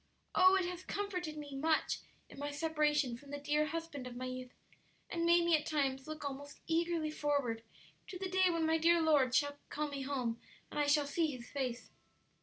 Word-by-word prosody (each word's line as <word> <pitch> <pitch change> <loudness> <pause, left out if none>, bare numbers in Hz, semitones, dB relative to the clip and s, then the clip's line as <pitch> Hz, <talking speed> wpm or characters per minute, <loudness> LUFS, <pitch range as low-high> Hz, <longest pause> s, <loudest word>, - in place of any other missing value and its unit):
Oh, 370 +1 +7
it 380 -2 +2
has 360 0 -4
comforted 360 -7 -3
me 290 -2 -7
much 315 +3 +1 0.3
in - - -12
my 290 0 -2
separation 295 -3 +1
from 280 +3 -15
the 285 - -4
dear 295 +1 +1
husband 320 -4 -5
of 245 - -8
my 255 +1 -4
youth, 255 0 -5 0.6
and 335 -1 0
made 340 0 +5
me 340 -1 +5
at 305 -1 -1
times 270 -3 0
look 310 -1 -6
almost 285 +1 -6
eagerly 330 -1 0
forward 285 -7 0 0.5
to 380 - -6
the 380 +1 -3
day 375 0 +3
when 335 -2 +1
my 320 0 +3
dear 340 +1 +5
Lord 290 -6 +4
shall 285 +1 +2
call 300 0 -2
me 280 -1 -4
home 255 -4 -2 0.3
and - - -3
I 290 - +2
shall 290 0 +4
see 320 +3 +1
His 250 -5 -7
face!" 255 -4 -3
295 Hz, 205 wpm, -35 LUFS, 275-330 Hz, 0.6 s, Oh